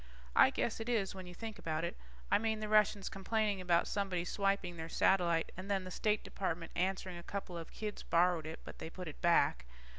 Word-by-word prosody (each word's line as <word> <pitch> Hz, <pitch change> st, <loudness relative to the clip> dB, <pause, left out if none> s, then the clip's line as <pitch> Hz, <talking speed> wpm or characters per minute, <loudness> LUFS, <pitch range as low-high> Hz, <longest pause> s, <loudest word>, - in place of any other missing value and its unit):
I -, -, +8 dB
guess 230 Hz, -, -1 dB
it 225 Hz, +2 st, -4 dB
is 215 Hz, -6 st, +1 dB
when 185 Hz, -1 st, -8 dB
you 180 Hz, -, -9 dB
think 220 Hz, -1 st, -6 dB
about 160 Hz, -2 st, -2 dB
it. 170 Hz, -, -2 dB, 0.4 s
I -, -, +5 dB
mean, 220 Hz, 0 st, 0 dB
the 215 Hz, -, -3 dB
Russians 210 Hz, -2 st, +3 dB
complaining 205 Hz, 0 st, 0 dB
about 175 Hz, -1 st, +3 dB
somebody 190 Hz, -4 st, -1 dB
swiping 195 Hz, -2 st, 0 dB
their 160 Hz, 0 st, -6 dB
satellite 170 Hz, -2 st, +3 dB
and 185 Hz, +2 st, -7 dB
then 195 Hz, -2 st, +1 dB
the 185 Hz, -, -7 dB
State 210 Hz, +3 st, +1 dB
Department 170 Hz, -3 st, -3 dB
answering 185 Hz, -1 st, -1 dB
a -, -, -8 dB
couple 190 Hz, 0 st, -5 dB
of 165 Hz, -1 st, -7 dB
kids 210 Hz, -1 st, -5 dB
borrowed 170 Hz, -2 st, +2 dB
it, 160 Hz, -, -7 dB
but -, -, -10 dB
they -, -, -5 dB
put 180 Hz, +1 st, -7 dB
it 155 Hz, -, -9 dB
back. 170 Hz, -, +3 dB
185 Hz, 215 wpm, -35 LUFS, 170-205 Hz, 0.4 s, I